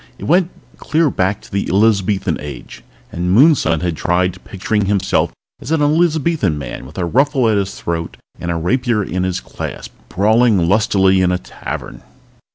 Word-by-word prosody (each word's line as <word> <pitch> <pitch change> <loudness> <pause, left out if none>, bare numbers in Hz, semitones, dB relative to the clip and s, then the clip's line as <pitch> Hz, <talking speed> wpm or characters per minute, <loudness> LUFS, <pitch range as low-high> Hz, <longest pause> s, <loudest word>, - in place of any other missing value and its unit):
It - - -11
went 175 +2 +2 0.3
clear 155 -2 +1
back 95 +2 -1
to - - -17
the 100 0 -2
Elizabethan 100 -3 +2
Age, 70 -4 -9 0.3
and 90 +1 -2
Moonson 120 - +4
had 85 -2 -1
tried 90 +2 -1
picturing 105 +1 -2
himself 100 -1 +1 0.3
as - - -8
an 160 -2 +1
Elizabethan 155 - +1
man 70 -2 -7
with 75 - -14
a 90 - -1
ruffle 135 - +2
at 110 -2 +2
his 100 0 -3
throat 85 -1 -4 0.2
and 85 - -4
a 85 - -1
rapier 115 +6 0
in 95 -1 -3
his 90 -1 -1
clasp, - - -7 0.2
brawling 110 -2 +3
lustily 95 -1 +3
in 90 -1 +2
a 90 - +1
tavern. - - -8
100 Hz, 165 wpm, -17 LUFS, 90-125 Hz, 0.3 s, Moonson